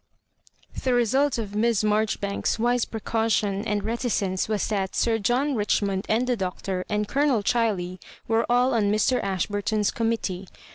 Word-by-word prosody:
The 255 -2 +1
result 265 +4 +2
of 210 -3 -4
Miss 220 0 +2
Maijoribanks's 210 -1 0
wise 240 +1 +1
precau 225 +1 -2
tion 200 -2 +1
and 205 -1 -1
reticence 215 -4 -1
was 210 -3 0
that 195 -3 -2
Sir 225 -1 +1
John 250 +7 +1
Richmond 200 -3 0
and 225 +3 +2
the 250 -1 +1
Doctor 185 -1 -3
and 210 0 0
Colonel 275 -5 +1
Chiley 195 -6 0 0.3
were 225 +1 +1
all 250 +2 +3
on 210 -3 +2
Mr. 215 +4 +2
Ashburton^s 205 +2 -1
committee. 220 -5 -2
215 Hz, 150 wpm, -25 LUFS, 200-235 Hz, 0.3 s, all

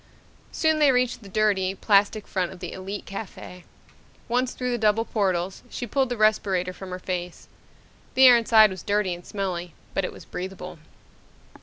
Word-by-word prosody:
Soon 315 -1 +1
they 295 -2 +6
reached 250 -1 0
the 200 - -12
dirty, 195 -2 +1
plastic 205 +1 +2
front 185 -2 -2
of 190 - -11
the 175 -1 -6
Elite 195 +2 -6
Cafe. 190 -3 -8 0.6
Once 250 +1 0
through 250 -1 -3
the 240 - -1
double 215 +1 +2
portals, 190 -4 -1
she 245 - -5
pulled 265 +3 0
the 245 - -3
respirator 195 -4 +1
from 190 0 -9
her 180 - -4
face. 180 -1 -5 0.7
The 265 - +7
air 250 -1 +10
inside 220 -2 +5
was 185 - -7
dirty 205 -3 0
and 175 0 -9
smelly 180 -5 -4 0.2
but 195 - 0
it - - -3
was - - -13
breathable. 180 -1 -7
200 Hz, 175 wpm, -25 LUFS, 185-230 Hz, 0.7 s, air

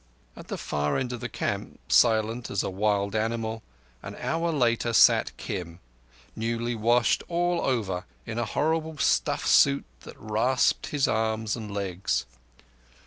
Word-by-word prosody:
At - - -11
the - - -4
far 75 0 -1
end 125 -1 -2
of 120 - -5
the 120 +1 -5
camp, - - -4
silent 115 0 +3
as 100 - -1
a - - -3
wild 100 +1 0
animal, 110 0 -2 0.4
an - - -8
hour 165 +1 -1
later 120 -5 +1
sat - - +5
Kim, 85 -1 -6 0.6
newly 115 +1 -2
washed 115 0 +2
all 175 0 0
over, 100 -9 -1 0.2
in 115 0 -4
a 120 - 0
horrible 160 +4 -1
stiff 140 - +1
suit 70 - +4
that - - -12
rasped 110 +4 +1
his 145 -2 +1
arms 110 0 0
and 110 -3 -7
legs. 100 -2 -2
115 Hz, 145 wpm, -26 LUFS, 105-125 Hz, 0.6 s, sat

